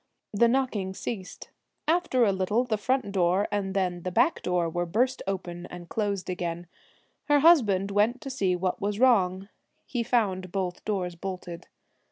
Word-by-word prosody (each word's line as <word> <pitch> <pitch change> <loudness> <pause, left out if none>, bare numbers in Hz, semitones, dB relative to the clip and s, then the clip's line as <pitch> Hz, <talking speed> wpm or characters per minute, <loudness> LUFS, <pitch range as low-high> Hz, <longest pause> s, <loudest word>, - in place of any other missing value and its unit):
The 235 +3 +4
knocking 230 -7 0
ceased. 190 -5 -6 0.4
After 325 -6 +2
a 200 - +3
little 195 +5 +1
the 240 -3 -1
front 255 +1 -1
door 185 +1 +2
and 195 -2 -2
then 180 -2 0
the 185 - -3
back 325 - +2
door 180 -2 0
were 175 +1 -2
burst 250 +9 +1
open, 180 -3 -4
and 175 -1 -10
closed 200 -4 -2
again. 175 -1 -3 0.6
Her 290 -1 +4
husband 210 - +4
went 210 +5 +2
to 275 -3 -6
see 195 -8 +1
what 180 0 -2
was 205 +1 -2
wrong. 195 -7 +3 0.4
He 245 - -2
found 195 -7 0
both 185 -2 -3
doors 185 -4 -1
bolted. 175 -1 -7
195 Hz, 165 wpm, -27 LUFS, 180-235 Hz, 0.6 s, The